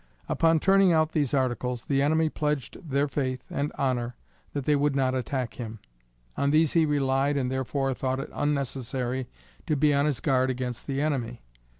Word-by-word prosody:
Upon 165 Hz, -1 st, +3 dB
turning 195 Hz, +1 st, +5 dB
out 160 Hz, -1 st, +3 dB
those 145 Hz, -5 st, 0 dB
articles, 125 Hz, -3 st, -1 dB
the 135 Hz, -1 st, +1 dB
enemy 160 Hz, +3 st, +3 dB
pledged 150 Hz, 0 st, -3 dB
their 140 Hz, +2 st, +2 dB
faith 130 Hz, -3 st, -2 dB
and 145 Hz, +1 st, -1 dB
honor 125 Hz, -3 st, -1 dB, 0.4 s
that 140 Hz, -3 st, -3 dB
they 150 Hz, -, +3 dB
would 145 Hz, 0 st, +1 dB
not 130 Hz, -2 st, +2 dB
attack 130 Hz, -2 st, -2 dB
him. 115 Hz, -2 st, -5 dB, 0.6 s
On 140 Hz, -, +1 dB
these 155 Hz, +1 st, +3 dB
he 165 Hz, -2 st, +4 dB
relied 140 Hz, 0 st, +1 dB
and 130 Hz, -2 st, -1 dB
therefore 130 Hz, +1 st, -1 dB
thought 130 Hz, +1 st, -2 dB
it -, -, -6 dB
unnecessary 130 Hz, -3 st, -2 dB, 0.4 s
to 155 Hz, -, +2 dB
be 145 Hz, +1 st, +3 dB
on 140 Hz, +1 st, +3 dB
his 140 Hz, -7 st, 0 dB
guard 130 Hz, +1 st, +2 dB
against 125 Hz, -2 st, -4 dB
the 140 Hz, 0 st, -1 dB
enemy. 125 Hz, -6 st, -2 dB
135 Hz, 180 wpm, -27 LUFS, 130-150 Hz, 0.6 s, turning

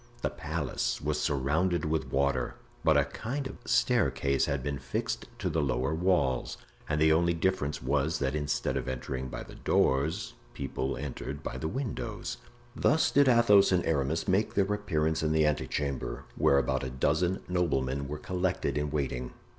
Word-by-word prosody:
The -, -, 0 dB
palace -, -, -2 dB
was 75 Hz, 0 st, -1 dB
surrounded 75 Hz, +4 st, +1 dB
with 80 Hz, +1 st, -1 dB
water, 65 Hz, -3 st, +1 dB, 0.3 s
but -, -, +5 dB
a -, -, +4 dB
kind 135 Hz, +5 st, -4 dB
of 135 Hz, -, -7 dB
staircase 70 Hz, -, +2 dB
had 70 Hz, -2 st, -1 dB
been 70 Hz, 0 st, -2 dB
fixed 65 Hz, -, -3 dB
to -, -, -2 dB
the 80 Hz, -, +1 dB
lower 65 Hz, 0 st, 0 dB
walls; 85 Hz, -6 st, +1 dB, 0.3 s
and 75 Hz, -, +1 dB
the 80 Hz, 0 st, +5 dB
only 85 Hz, +1 st, +2 dB
difference 75 Hz, -6 st, -1 dB
was, 75 Hz, +5 st, +1 dB
that 70 Hz, -2 st, -1 dB
instead 75 Hz, -2 st, -1 dB
of 65 Hz, -1 st, -3 dB
entering 65 Hz, 0 st, -3 dB
by -, -, -6 dB
the -, -, -12 dB
doors, 70 Hz, +4 st, +1 dB, 0.2 s
people 70 Hz, -1 st, -3 dB
entered 70 Hz, +1 st, -5 dB
by -, -, -4 dB
the 80 Hz, -, -2 dB
windows. 125 Hz, -, -4 dB, 0.4 s
Thus 160 Hz, +2 st, +3 dB
did 140 Hz, -1 st, +5 dB
Athos 115 Hz, -5 st, +6 dB
and 90 Hz, -2 st, +2 dB
Aramis 80 Hz, +1 st, 0 dB
make 100 Hz, +3 st, +1 dB
their 100 Hz, 0 st, +2 dB
appearance 80 Hz, -6 st, 0 dB
in 80 Hz, 0 st, +1 dB
the 80 Hz, -1 st, +4 dB
ante 75 Hz, -1 st, 0 dB
chamber, 70 Hz, -3 st, -3 dB
where 70 Hz, -, +4 dB
about 65 Hz, 0 st, +1 dB
a 65 Hz, -, -3 dB
dozen 80 Hz, +8 st, +1 dB
noblemen 70 Hz, -6 st, 0 dB
were 75 Hz, +2 st, -4 dB
collected 90 Hz, -2 st, -1 dB
in 75 Hz, 0 st, -1 dB
waiting. 65 Hz, -4 st, -2 dB
75 Hz, 170 wpm, -29 LUFS, 70-90 Hz, 0.4 s, Athos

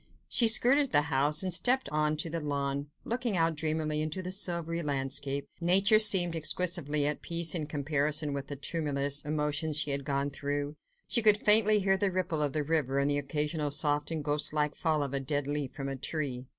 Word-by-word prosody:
She 235 Hz, -, +3 dB
skirted 255 Hz, +5 st, +5 dB
the 145 Hz, -1 st, +4 dB
house, 145 Hz, +5 st, +2 dB
and 185 Hz, -2 st, 0 dB
stepped 255 Hz, +8 st, +2 dB
on 150 Hz, 0 st, -1 dB
to 155 Hz, -, -2 dB
the 165 Hz, -, -2 dB
lawn, 140 Hz, -1 st, -3 dB, 0.2 s
looking 235 Hz, -4 st, -2 dB
out 165 Hz, 0 st, +1 dB
dreamily 155 Hz, -1 st, -2 dB
into 155 Hz, +4 st, -4 dB
the 180 Hz, -, -5 dB
silvery 170 Hz, -3 st, -1 dB
landscape. 140 Hz, -1 st, -2 dB
Nature 195 Hz, +5 st, +4 dB
seemed 190 Hz, -6 st, +4 dB
exquisitely 160 Hz, -3 st, 0 dB
at 150 Hz, +1 st, -2 dB
peace, 170 Hz, -1 st, -1 dB
in 155 Hz, -4 st, -3 dB
comparison 150 Hz, 0 st, -2 dB
with 140 Hz, -1 st, -5 dB
the 145 Hz, -, -6 dB
tumultuous 145 Hz, -1 st, -1 dB
emotions 150 Hz, +1 st, -1 dB
she 150 Hz, -1 st, 0 dB
had 140 Hz, 0 st, -1 dB
gone 140 Hz, 0 st, -2 dB
through: 145 Hz, +1 st, -4 dB, 0.3 s
she 235 Hz, -, +2 dB
could 210 Hz, -2 st, +5 dB
faintly 210 Hz, 0 st, +5 dB
hear 195 Hz, 0 st, +1 dB
the 200 Hz, 0 st, 0 dB
ripple 180 Hz, -4 st, -2 dB
of 145 Hz, -2 st, 0 dB
the 150 Hz, -, -1 dB
river 145 Hz, -3 st, -1 dB
and 140 Hz, +1 st, +1 dB
the 145 Hz, -, 0 dB
occasional 150 Hz, +1 st, -2 dB
soft 145 Hz, 0 st, 0 dB
and 160 Hz, -2 st, -4 dB
ghostlike 150 Hz, 0 st, 0 dB
fall 155 Hz, -3 st, -1 dB
of 140 Hz, -1 st, -5 dB
a 140 Hz, -, 0 dB
dead 145 Hz, +1 st, -3 dB
leaf 145 Hz, -2 st, -4 dB
from 135 Hz, -1 st, -5 dB
a 135 Hz, -, -4 dB
tree. 130 Hz, -2 st, -4 dB
150 Hz, 200 wpm, -29 LUFS, 145-170 Hz, 0.3 s, skirted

